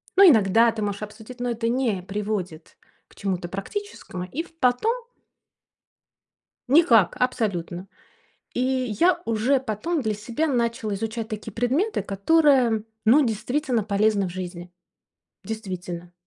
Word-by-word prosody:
Ну 395 - +7
иногда 225 -1 +5
ты 215 - -5
можешь 205 0 -3
обсудить, 220 +4 -10
но 245 0 -1
это 230 0 -2
не 235 -7 0
приводит 195 -4 -4 0.3
к - - -23
чему-то 185 -3 -3
практическому. 195 - -6
И 275 - -4
в - - -18
потом 255 - +2 1.7
Никак, 245 - +5
абсолютно. 195 -7 -1 0.7
И - - -3 0.4
я 360 0 +4
уже 230 +5 +2
потом 265 - -2
для 215 -2 -1
себя 235 +9 -2
начала 235 -5 -1
изучать 220 +2 -3
такие 215 0 -6
предметы, 265 - 0
которые, 245 0 +3 0.2
ну, 270 +5 +6
действительно 245 +1 -1
полезны 205 -1 +1
в - - -6
жизни. 180 -1 -7 0.7
Действительно. 180 -5 -6
220 Hz, 125 wpm, -24 LUFS, 195-250 Hz, 1.7 s, Ну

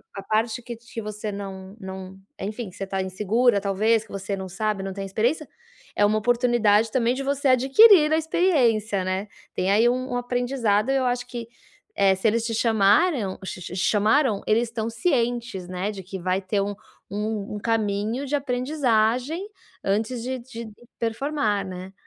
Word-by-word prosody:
a 195 - -6
parte 225 +2 0
que 235 0 -7
te 230 0 -9
você 210 0 -5
não 195 -1 -7
não, 190 -1 -8 0.2
enfim, 215 +2 -4
você 195 +1 -6
tá 195 0 -2
insegura 205 +4 +2
talvez, 215 +3 +2
que - - -17
você 195 0 -3
não 190 -1 -6
sabe, 210 0 -2
não 195 - -4
tem 195 0 -5
experiência, 240 +10 0 0.5
é 205 - +2
uma 215 +1 +2
oportunidade 230 -2 +3
também 240 -1 +2
de 270 +2 -4
você 280 0 0
adquirir 300 - +7
a 315 - +4
experiência, 240 - +2
né. 190 +2 -2 0.3
Tem 185 +2 0
aí 225 +4 +5
um 255 +1 0
um 245 - 0
aprendizado, 245 -2 0
eu 270 -1 +2
acho 245 0 0
que, 240 -2 -7 0.5
eh, 195 -1 +4
se 190 +4 0
eles 230 +1 +1
te 230 - -2
chamaram 220 - +2
ch 185 - -6
ch 175 - -7
chamaram 215 +4 +2
eles 220 +2 +3
estão 225 0 -3
cientes, 235 - -1
né, 185 +3 -2
de 195 -2 -8
que 190 +1 -7
vai 185 +2 0
ter 195 +2 -1
um 205 +1 -2 0.3
um 210 0 -3
caminho 220 +3 -1
de 285 +2 -1
aprendizagem 255 - 0 0.3
antes 220 +5 -1
de 255 +1 -3
de 235 -2 -8 0.3
performar, 225 -4 -1
né. 185 +1 -8
220 Hz, 170 wpm, -24 LUFS, 200-245 Hz, 0.5 s, adquirir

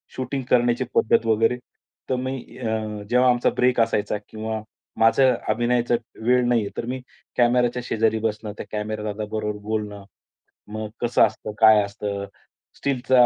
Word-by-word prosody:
Shooting 130 +1 -3
करण्याची 120 0 +3
पद्धत 115 +1 +3
वगैरे. 115 +2 +2 0.5
तर 130 - +2
मी 130 +1 -3 0.2
अ, 110 -3 -3
जेव्हा 125 +1 +4
आमचा 120 0 +3
ब्रेक 125 0 +3
असायचा 105 -2 0
किंवा 110 0 -4 0.4
माझं 125 +3 +5 0.2
अभिनयाचा 120 +2 +2 0.3
वेळ 125 +1 +3
नाहीये, 115 -4 +2
तर 115 - -2
मी 130 +2 -3 0.4
कॅमेराच्या 120 0 +3
शेजारी 110 0 +1
बसणं, 105 -1 -2
त्या - - -6
कॅमेरा 105 0 -3
दादा 105 0 -3
बरोबर 105 -1 -2
बोलणं. 105 -1 -4 0.7
मग 110 0 -4
कसं 120 -1 +3
असतं, 110 0 -6
काय 110 -2 +7
असतं? 100 0 -4 0.5
स्टीलचा 130 -2 +3
115 Hz, 145 wpm, -23 LUFS, 110-125 Hz, 0.7 s, काय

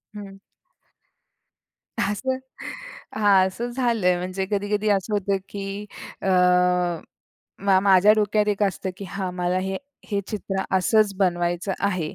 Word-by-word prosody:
हं. 195 -1 -9 1.6
असं 260 +6 -1 0.8
हां 195 -3 +5
असं 230 +6 -4
झालंय. 230 -8 +1
म्हणजे 185 +2 -3
कधी-कधी 205 +1 0
असं 200 +1 +1
होतं 200 -1 +1
की 200 +1 -5 0.4
अ, - - -3 1.4
मा 190 -1 +5
माझ्या 195 +1 +6
डोक्यात 210 0 +1
एक 205 0 0
असतं 195 -1 -1
की 200 - -7
हां, 190 0 -3
मला 180 0 0
हे, 190 +1 -2 0.3
हे 200 -1 +1
चित्र 195 -2 -3
असंच 210 +2 +3
बनवायचं 175 0 0
आहे. 185 -6 -1
195 Hz, 125 wpm, -24 LUFS, 185-210 Hz, 1.6 s, माझ्या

